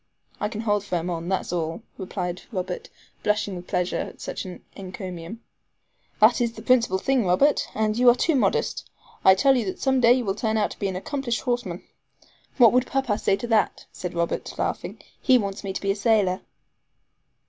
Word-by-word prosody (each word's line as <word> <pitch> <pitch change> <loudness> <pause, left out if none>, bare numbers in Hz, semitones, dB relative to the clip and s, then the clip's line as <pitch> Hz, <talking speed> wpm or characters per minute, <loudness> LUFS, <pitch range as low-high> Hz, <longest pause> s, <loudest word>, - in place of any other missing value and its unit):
"I 210 - -1
can 215 -1 -5
hold 205 -3 +1
firm 180 -3 -2
on, 170 +1 -4
that's 190 -2 -1
all," 165 +4 -2
replied 180 -2 -4
Robert 230 - -4 0.3
blushing 210 -2 0
with 180 0 -8
pleasure 180 0 -1
at - - -6
such - - -5
an 180 -1 -9
encomium. 185 +1 -7 0.8
"That 225 +4 +5
is 235 -1 0
the 220 - -10
principal 235 -6 +3
thing, 260 +5 +1
Robert; 195 +11 +3
but 215 0 0
you 250 0 +7
are 240 - +6
too 320 +6 +1
modest. 260 - 0 0.3
I 190 - +8
tell 270 +8 +4
you 245 - +1
that 190 - -4
some 265 -1 +2
day 235 0 +7
you 250 -1 0
will 195 - 0
turn 220 +1 -1
out 210 - 0
an 195 -2 -1
accomplished 240 +4 -2
horseman." 240 -9 -2 0.7
"What 240 -4 +7
would 250 +1 +3
papa 265 -6 0
say 195 - +2
to 200 +4 -6
that?" 225 -2 +1
said 180 -1 -6
Robert, 170 0 -2
laughing. - - -3 0.2
"He 260 -2 +5
wants 200 -3 -3
me 195 - -3
to 190 - -4
be 195 - +1
a - - -1
sailor." 205 -3 +2
210 Hz, 190 wpm, -25 LUFS, 185-240 Hz, 0.8 s, I